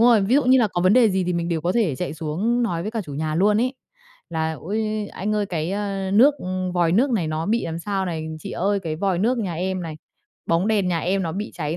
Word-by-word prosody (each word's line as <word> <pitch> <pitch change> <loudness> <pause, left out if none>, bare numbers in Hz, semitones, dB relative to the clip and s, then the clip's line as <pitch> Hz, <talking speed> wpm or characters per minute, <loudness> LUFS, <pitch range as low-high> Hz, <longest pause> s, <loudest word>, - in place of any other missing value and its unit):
rồi, 235 -2 +6
ví 205 +6 +2
dụ 285 - +4
như 260 +1 +5
là 230 -4 +3
có 175 - -2
vấn 185 +2 +5
đề 240 -3 +5
gì 190 -1 0
thì 180 - -1
mình 170 -1 -1
đều 165 -2 -1
có 175 +3 0
thể 195 - +1
chạy 175 -1 -3
xuống 185 +11 -1
nói 175 -8 -1
với 210 - -3
cả 225 0 -2
chủ 145 -6 -8
nhà 155 +1 -2
luôn 205 +5 +3
ấy. 255 +2 0 0.6
Là 160 -1 -1
"Ôi, 215 +3 -2
anh 210 +3 -2
ơi 210 -1 0
cái, 165 -2 -2
ơ, 195 -1 -2
nước, 260 +8 +6
ừm, 185 0 -3
vòi 175 -2 +2
nước 255 +8 +3
này 185 -10 0
nó 155 +1 -2
bị 230 +2 +1
làm 165 0 -4
sao" 195 +1 -2
này, 160 -2 -3
"Chị - - -7
ơi 200 +2 0
cái 160 -4 -4
vòi 190 +1 0
nước 240 +6 +1
nhà 190 -7 -2
em" 185 +2 -2
này, 160 -2 -6 0.5
"bóng 170 +5 +1
đèn 205 -4 +2
nhà 175 -2 +1
em 190 +3 0
nó 165 -3 -2
bị 205 +4 -4
cháy" 155 0 -3
190 Hz, 275 wpm, -23 LUFS, 170-215 Hz, 0.6 s, rồi